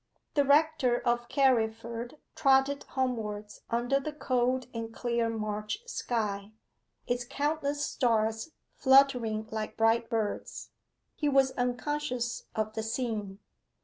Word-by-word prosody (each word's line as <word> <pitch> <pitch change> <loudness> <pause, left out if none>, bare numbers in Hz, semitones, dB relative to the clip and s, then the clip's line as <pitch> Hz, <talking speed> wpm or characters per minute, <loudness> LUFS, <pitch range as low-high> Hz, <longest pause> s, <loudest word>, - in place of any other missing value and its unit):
The 285 - +4
rector 285 -4 +3
of 240 0 0
Carriford 235 -1 +1 0.2
trotted 275 0 +3
homewards 220 -5 -3
under 245 +4 +1
the 305 +3 -4
cold 255 -3 0
and 230 -1 -4
clear 235 -1 0
March 215 - -3
sky, 210 - -2 0.5
its 245 0 -1
countless 290 +2 -1
stars 225 0 +1 0.2
fluttering 250 -5 +4
like 215 -1 -4
bright 225 +1 +3
birds. 220 -3 -3 0.4
He 295 - 0
was 270 -1 +4
unconscious 250 0 -2
of 215 0 -1
the 220 - -2
scene. 220 -4 -3
240 Hz, 115 wpm, -30 LUFS, 220-270 Hz, 0.5 s, The